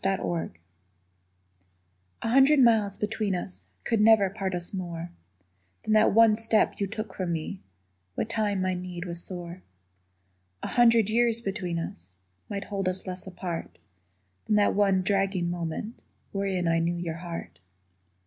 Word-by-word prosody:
DISTANCE 190 Hz, -, -1 dB, 1.7 s
A -, -, -1 dB
hundred 270 Hz, +4 st, +6 dB
miles 220 Hz, -5 st, +4 dB
between 210 Hz, -2 st, -1 dB
us 180 Hz, +1 st, -6 dB, 0.2 s
Could 225 Hz, -2 st, +1 dB
never 210 Hz, -3 st, +5 dB
part 195 Hz, -2 st, -3 dB
us 175 Hz, +2 st, -5 dB
more 175 Hz, -2 st, -5 dB, 0.7 s
Than 215 Hz, -, 0 dB
that 215 Hz, 0 st, +5 dB
one 225 Hz, 0 st, +6 dB
step 225 Hz, 0 st, +1 dB
you 200 Hz, -, 0 dB
took 215 Hz, -1 st, -5 dB
from 185 Hz, -2 st, -3 dB
me 170 Hz, +4 st, -4 dB, 0.5 s
What -, -, -1 dB
time 210 Hz, -4 st, 0 dB
my 185 Hz, 0 st, +1 dB
need 180 Hz, -1 st, -5 dB
was 170 Hz, -1 st, -5 dB
sore. 175 Hz, -1 st, -7 dB, 1.0 s
A -, -, -3 dB
hundred 230 Hz, -3 st, +5 dB
years 235 Hz, 0 st, +3 dB
between 195 Hz, -5 st, -3 dB
us 90 Hz, -, -6 dB, 0.3 s
Might 200 Hz, 0 st, -3 dB
hold 195 Hz, -2 st, -3 dB
us 185 Hz, +1 st, -4 dB
less 185 Hz, 0 st, -6 dB
apart 180 Hz, -2 st, -5 dB, 0.7 s
Than 210 Hz, -, +2 dB
that 205 Hz, -1 st, +4 dB
one 195 Hz, -2 st, +3 dB
dragging 195 Hz, -3 st, +1 dB
moment 175 Hz, +6 st, -4 dB, 0.3 s
Wherein 195 Hz, -3 st, -1 dB
I 165 Hz, 0 st, +3 dB
knew 170 Hz, +1 st, 0 dB
your 165 Hz, -2 st, -4 dB
heart. 165 Hz, -, -7 dB
195 Hz, 150 wpm, -27 LUFS, 175-215 Hz, 1.7 s, hundred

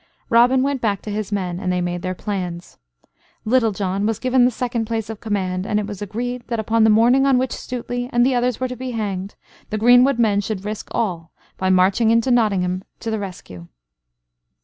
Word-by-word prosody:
Robin 245 Hz, +3 st, +5 dB
went 275 Hz, -2 st, -1 dB
back 205 Hz, -4 st, 0 dB
to 210 Hz, -, -5 dB
his 210 Hz, 0 st, -4 dB
men, 180 Hz, -3 st, -2 dB
and 185 Hz, -1 st, -2 dB
they 180 Hz, -, 0 dB
made 175 Hz, 0 st, -2 dB
their 185 Hz, 0 st, -3 dB
plans. 180 Hz, -4 st, -5 dB, 0.7 s
Little 230 Hz, 0 st, +3 dB
John 195 Hz, +1 st, -1 dB
was 225 Hz, -2 st, -1 dB
given 255 Hz, -1 st, +3 dB
the -, -, +4 dB
second 240 Hz, -1 st, -2 dB
place 225 Hz, -1 st, -3 dB
of 220 Hz, -, -8 dB
command, 190 Hz, -3 st, -2 dB
and 210 Hz, -, +1 dB
it 210 Hz, -, -2 dB
was 205 Hz, -1 st, -7 dB
agreed 240 Hz, +5 st, -4 dB
that 235 Hz, -2 st, -2 dB
upon 225 Hz, +1 st, +2 dB
the 220 Hz, -, +5 dB
morning 240 Hz, +5 st, +4 dB
on 270 Hz, -2 st, +4 dB
which 260 Hz, 0 st, 0 dB
Stuteley 245 Hz, 0 st, -4 dB
and 240 Hz, 0 st, +3 dB
the 265 Hz, -, +2 dB
others 245 Hz, -1 st, 0 dB
were 255 Hz, -, -1 dB
to 250 Hz, -, -6 dB
be 255 Hz, 0 st, -5 dB
hanged 200 Hz, -3 st, -4 dB, 0.3 s
the 215 Hz, -, -2 dB
greenwood 245 Hz, +4 st, +5 dB
men 210 Hz, -4 st, +2 dB
should 200 Hz, -1 st, -5 dB
risk 210 Hz, 0 st, -5 dB
all 175 Hz, -8 st, -2 dB, 0.2 s
by 190 Hz, -, -1 dB
marching 190 Hz, +5 st, +3 dB
into 230 Hz, +3 st, +3 dB
Nottingham 190 Hz, -6 st, +1 dB, 0.2 s
to 225 Hz, -, -4 dB
the 220 Hz, -, -1 dB
rescue. 135 Hz, -, -8 dB
220 Hz, 210 wpm, -21 LUFS, 190-245 Hz, 0.7 s, Robin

